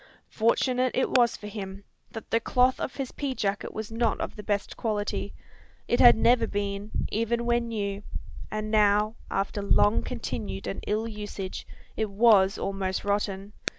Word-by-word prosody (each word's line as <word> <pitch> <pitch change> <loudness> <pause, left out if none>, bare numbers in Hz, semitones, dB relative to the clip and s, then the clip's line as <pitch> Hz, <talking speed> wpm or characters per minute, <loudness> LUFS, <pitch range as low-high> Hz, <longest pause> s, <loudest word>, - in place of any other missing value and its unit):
Fortunate 250 +3 +2
it 260 - +1
was 240 -2 +4
for - - -11
him, 200 -2 -6 0.3
that 225 - -9
the 230 - +4
cloth 250 +2 +2
of - - -4
his 270 -2 -4
pea 275 -3 -3
jacket 200 -2 -2
was 220 0 -6
not 225 -1 0
of - - -4
the 210 - -7
best 205 -1 -2
quality. 205 -3 -2 0.6
It 240 - +1
had 240 - +9
never 240 +2 +4
been, 200 0 -3 0.2
even 235 +2 0
when 235 0 +1
new; 200 -3 -3 0.5
and 215 0 -3
now, 210 0 +4 0.2
after 195 +1 -1
long 205 +1 +3
continued 110 - -5
and 100 - -4
ill 215 +2 0
usage, 205 -3 -6 0.3
it 220 -1 -1
was 200 -2 +5
almost 195 -1 -2
rotten. 200 0 -1
210 Hz, 160 wpm, -27 LUFS, 200-235 Hz, 0.6 s, had